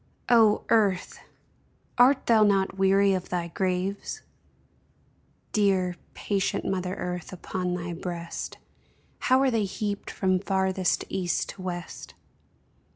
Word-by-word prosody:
O 225 -3 +5
Earth! 200 -5 +2 0.8
art 255 +3 +5
thou 225 -2 +5
not 195 -2 +2
weary 195 +1 +4
of 185 -1 -3
thy 175 -1 -2
graves? 185 +2 -2 1.3
Dear, 190 -4 +2 0.2
patient 200 -2 -1
mother 185 -1 -2
Earth, 180 0 -5
upon 180 -1 -3
thy 175 -1 -4
breast 170 -1 -6 0.6
How 260 0 +3
are 270 -1 +3
they 225 -3 +1
heaped 205 +1 -4
from 185 -1 +1
farthest 190 -1 0
east 180 -2 -1
to 190 - -9
west 175 -2 -6
190 Hz, 115 wpm, -26 LUFS, 180-205 Hz, 1.3 s, O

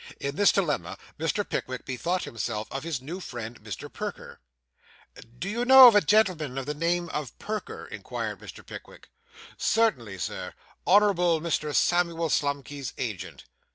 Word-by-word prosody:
In 140 0 -3
this 205 +3 +5
dilemma 170 -7 -1 0.2
Mr. 180 +6 -1
Pickwick 130 -1 -4
bethought 170 +8 -2
himself 110 -1 -4
of 135 - -4
his 155 -6 -4
new 170 +7 -6
friend, 120 -8 -7
Mr. - - -6
Perker. - - -6 1.0
'Do 180 - -4
you 230 +4 -1
know 255 -2 +10
a 205 - +7
gentleman 170 -8 +2
of 135 - -3
the 150 - -2
name 170 +3 0
of 150 -5 -5
Perker?' 215 0 -5
inquired - - -5
Mr. - - -11
Pickwick. - - -11 0.5
'Certainly, 130 - +1
Sir; 90 - -5 0.3
Honourable 180 -4 +4
Mr. 155 -2 -2
Samuel 170 -2 +2
Slumkey's 140 -3 -2
agent. 105 -8 -5
160 Hz, 145 wpm, -27 LUFS, 130-185 Hz, 1.0 s, know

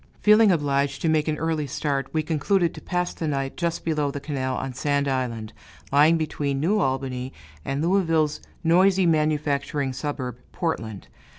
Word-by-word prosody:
Feeling 215 0 +6
obliged 140 -3 0
to 165 - +2
make 155 -1 +2
an 155 -1 0
early 160 -2 -1
start, 135 0 -2
we 155 -1 0
concluded 170 +3 +1
to - - -10
pass 180 -1 -2
the 160 - -4
night 135 -2 -2
just 170 -1 -2
below 150 -3 0
the 145 - -4
canal 135 -3 -3
on 130 +1 -4
Sand 140 +2 0
Island, 120 -5 -2 0.4
lying 150 +4 +5
between 145 -3 -2
New 195 +9 +2
Albany 130 -1 -2 0.3
and 135 - -2
Louisville's 165 -4 +1 0.2
noisy 185 +3 +4
manufacturing 150 -3 0
suburb, 130 -3 -4
Portland. 110 - -3
145 Hz, 160 wpm, -24 LUFS, 135-165 Hz, 0.4 s, Feeling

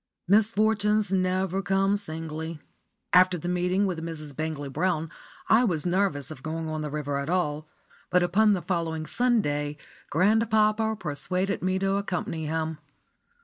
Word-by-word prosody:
*_ - - -60 0.2
Misfortunes 210 0 +3
never 185 0 +1
come 195 +1 +2
singly. 160 -4 -5 0.5
After 180 0 +6
the 175 - -6
meeting 180 +2 +1
with 175 -4 -3
Mrs. 155 -4 -7
Bangley 155 -1 -3
Brown 160 +2 -1 0.4
I 225 +3 +5
was 175 -9 0
nervous 175 -6 0
of 135 - -9
going 160 +2 -4
on 155 0 -3
the 150 - -3
river 145 -1 -2
at 140 +2 -4
all, 155 -4 -1 0.4
but 180 0 +3
upon 210 +4 +4
the 185 - -2
following 165 -3 -2
Sunday 150 -12 0 0.3
grandpapa 220 +4 +2
persuaded 180 +5 -1
me 185 +1 0
to 195 +1 +1
accompany 175 -5 -3
him. 160 0 -2
180 Hz, 145 wpm, -27 LUFS, 155-195 Hz, 0.5 s, After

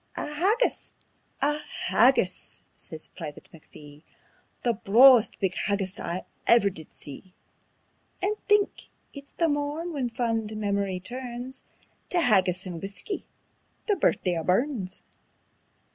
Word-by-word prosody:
"A - - -2
haggis! 390 +12 0 0.5
A 295 +1 +2
HAGGIS!" - - +1
says 160 -1 -9
Private 155 -5 -9
McPhee; 150 -2 -14 0.6
"The 240 - +2
brawest 230 +3 +6
big 190 -3 0
haggis 195 -1 -1
I 175 +2 -4 0.2
ever 230 -4 +5
did 160 -4 -7
see. 180 +6 -10 0.8
And 405 +3 0
think! 415 -1 +2 0.2
it's 280 -1 -11
the 335 - +1
morn 295 +3 -2
when 265 -5 -1
fond 225 -3 -2
memory 200 -3 -1
turns 250 +4 -6 0.5
Tae 355 - +2
haggis 190 - +3
and 175 -3 -6
whuskey 200 - -4 0.6
the 415 - +3
Birthday 180 - +1
o' - - -4
Burns. 195 - -1
225 Hz, 120 wpm, -27 LUFS, 185-285 Hz, 0.8 s, brawest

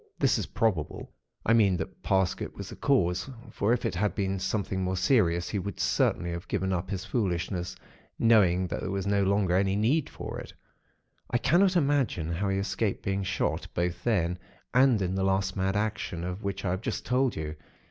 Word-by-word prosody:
This - - +2
is - - -3
probable, 100 -9 -1 0.3
I 115 - +4
mean 100 -5 +4
that - - -6
Parsket 95 -1 0
was - - -7
the - - -8
cause, 95 -7 +1 0.2
for 105 +2 0
if 120 0 +1
it - - 0
had 100 +3 0
been 95 -1 -1
something 95 -1 -1
more 95 0 -1
serious, 90 -4 +2
he 105 - -1
would 100 0 -5
certainly 85 0 +1
have 85 +1 -6
given 95 -1 -1
up 90 +1 -2
his 95 -2 -3
foolishness, 90 -4 -2 0.4
knowing 95 -6 +4
that - - -3
there - - -3
was 100 0 -2
no 100 0 +2
longer 100 -2 +2
any 95 +1 +2
need 125 +9 +2
for - - -6
it. - - -9 0.8
I 120 - +2
cannot 175 +10 +3
imagine 140 - +1
how 95 +4 -1
he 95 - +1
escaped 100 +1 -1
being 100 0 0
shot, 95 -1 -1
both 85 0 -1
then, 90 -6 +1 0.3
and 125 -3 +5
in 90 0 -1
the 95 0 0
last 95 0 +1
mad 95 0 0
action, 105 -5 -2
of 90 +3 -4
which 100 -1 -3
I 90 - +1
have 95 +2 -2
just - - -3
told 130 0 +1
you. 75 0 -4
95 Hz, 200 wpm, -28 LUFS, 90-110 Hz, 0.8 s, and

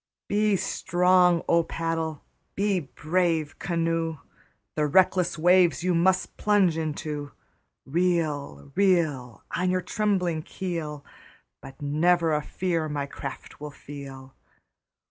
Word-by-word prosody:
Be 210 0 +2
strong, 180 -1 +3
O 170 - +4
paddle! 165 -2 -3 0.3
be 200 -1 +1
brave, 160 +1 -1
canoe! 165 -1 -1 0.6
The 150 -1 0
reckless 180 +1 +3
waves 175 +1 +4
you 180 0 +2
must 185 +2 +1
plunge 200 -5 +3
into. 150 -2 -4 0.5
Reel, 155 -3 -1
reel. 160 - +1
On 180 0 +1
your 185 0 0
trembling 185 -6 0
keel, 155 -5 -5 0.6
But 135 +2 -11
never 165 +3 +2
a 150 - +1
fear 165 -1 -2
my 145 -1 -2
craft 140 0 -8
will 150 - -5
feel. 135 -2 -10
165 Hz, 110 wpm, -26 LUFS, 150-180 Hz, 0.6 s, O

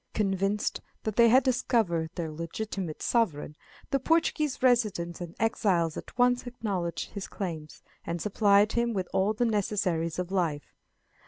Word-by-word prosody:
Convinced 195 0 0 0.2
that 215 -2 -3
they 235 0 +6
had 255 +3 +6
discovered 225 -10 +1
their 165 -3 -3
legitimate 170 +1 -5
sovereign, 160 -11 0 0.4
the 275 - +2
Portuguese 305 -2 +1
residents 210 -9 +1
and 170 -1 -7
exiles 190 -7 +1
at - - -9
once 245 0 +3
acknowledged 195 -8 -3
his 200 -2 -6
claims, 160 -6 -6 0.2
and 170 +1 -3
supplied 205 +1 +3
him 235 0 0
with 190 -3 -2
all 195 +3 +2
the 240 +3 0
necessaries 190 -6 0
of 180 0 -3
life. 165 -6 -1
200 Hz, 145 wpm, -28 LUFS, 170-235 Hz, 0.4 s, they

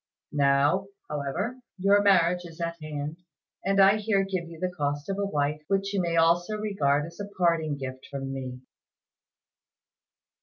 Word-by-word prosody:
Now, 145 +6 +3 0.2
however, 150 - -2 0.2
your 200 +2 +4
marriage 180 -3 +4
is 165 -1 -11
at 170 -1 -3
hand, 150 +1 -5 0.5
and 195 +1 +2
I 195 +2 +7
here 205 -2 +1
give 185 -3 -3
you 165 -1 -11
the 185 +1 -1
cost 145 -1 -2
of 195 0 -2
a 200 - +1
wife, 150 -3 -1
which 195 0 0
you 195 - +1
may 170 -1 -1
also 170 +5 +3
regard 150 -9 +1
as 170 +3 -12
a 205 0 -5
parting 165 -4 +2
gift 130 -1 -7
from 135 -1 -4
me." 130 -1 -6
170 Hz, 160 wpm, -27 LUFS, 145-195 Hz, 0.5 s, I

